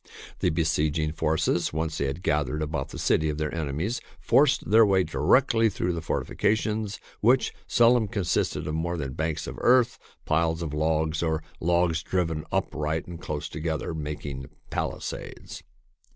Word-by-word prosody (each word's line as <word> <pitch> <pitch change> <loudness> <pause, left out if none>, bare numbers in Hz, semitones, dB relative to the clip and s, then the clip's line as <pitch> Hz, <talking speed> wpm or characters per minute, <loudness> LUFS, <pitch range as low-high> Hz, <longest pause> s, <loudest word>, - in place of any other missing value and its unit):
The - - +2
besieging 80 -1 +1
forces, 80 +2 0
once 80 0 -2
they 70 - +1
had 70 +7 -4
gathered 75 -3 0
about 75 -3 -3
the - - -8
city 80 0 +2
of 75 - -2
their 75 -1 -2
enemies, 80 - -2 0.2
forced 145 -6 +3
their 115 +1 +8
way 95 -3 +4
directly 110 - +3
through 90 -2 -1
the 85 - -3
fortifications, 110 +4 -1 0.2
which 125 +4 +3
seldom 120 -1 +4
consisted 100 -6 -1
of 75 - -3
more 85 +2 -1
than 70 -4 -4
banks 80 +1 -2
of - - -7
earth, 125 -1 +4 0.3
piles 80 +1 +1
of 75 -3 -4
logs, 80 +1 0
or 80 -2 0 0.2
logs 85 -1 +2
driven 80 -2 -1
upright 75 +1 -1
and 85 -1 -9
close 75 -1 -4
together, 80 +1 -3
making 75 -3 -5 0.2
palisades. - - -5
80 Hz, 150 wpm, -26 LUFS, 75-95 Hz, 0.3 s, their